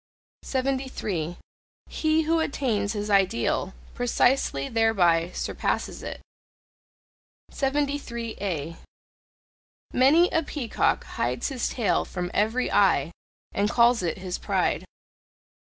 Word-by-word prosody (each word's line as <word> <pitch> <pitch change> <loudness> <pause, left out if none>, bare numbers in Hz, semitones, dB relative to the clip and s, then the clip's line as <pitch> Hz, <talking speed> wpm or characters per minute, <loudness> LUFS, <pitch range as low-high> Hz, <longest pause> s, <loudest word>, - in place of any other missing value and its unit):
73. 255 - -2 0.5
He 315 0 +1
who 325 +1 +2
attains 230 -9 -1
his 210 0 -3
ideal, 190 - +1 0.2
precisely 245 - +1
thereby 180 -7 +3
surpasses - - -2
it. - - -7 1.3
73A. 235 - -2 1.2
Many 295 +8 +5
a 325 - +2
peacock 290 -6 -1
hides - - -2
his 260 -3 -2
tail 230 -5 +1
from 180 -1 -5
every 225 +5 +1
eye 170 -7 +3 0.4
and 205 +1 0
calls 235 -1 +4
it 170 -3 -2
his 185 -1 -5
pride. - - 0
225 Hz, 95 wpm, -26 LUFS, 185-270 Hz, 1.3 s, Many